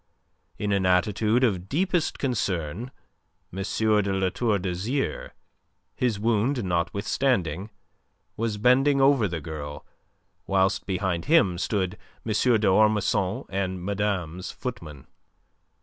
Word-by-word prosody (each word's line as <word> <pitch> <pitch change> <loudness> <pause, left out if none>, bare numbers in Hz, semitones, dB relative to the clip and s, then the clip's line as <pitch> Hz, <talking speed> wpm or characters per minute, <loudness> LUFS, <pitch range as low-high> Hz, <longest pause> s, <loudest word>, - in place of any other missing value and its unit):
In 105 -1 -2
an 100 -2 +2
attitude 105 +6 +2
of 95 -6 0
deepest 175 - 0
concern, 100 - -2 0.6
M. 95 - -4 0.2
de 110 -1 +3
La 95 -1 +1
Tour 110 0 0
d'Azyr, 100 +9 -2 0.7
his 120 -5 0
wound 115 +3 +1
notwithstanding, 95 - 0 0.7
was 110 -2 -2
bending 135 +5 +4
over 135 -5 +4
the 85 -3 -4
girl, 75 -2 -7 0.6
whilst 95 +1 +1
behind 95 -3 -1
him 105 - +3
stood 95 -1 -1 0.3
M. 110 - -2 0.3
d'Ormesson 105 -2 +2
and 95 -2 -2
madame's 95 -4 -2
footman. 80 - -7
100 Hz, 105 wpm, -26 LUFS, 90-115 Hz, 0.7 s, bending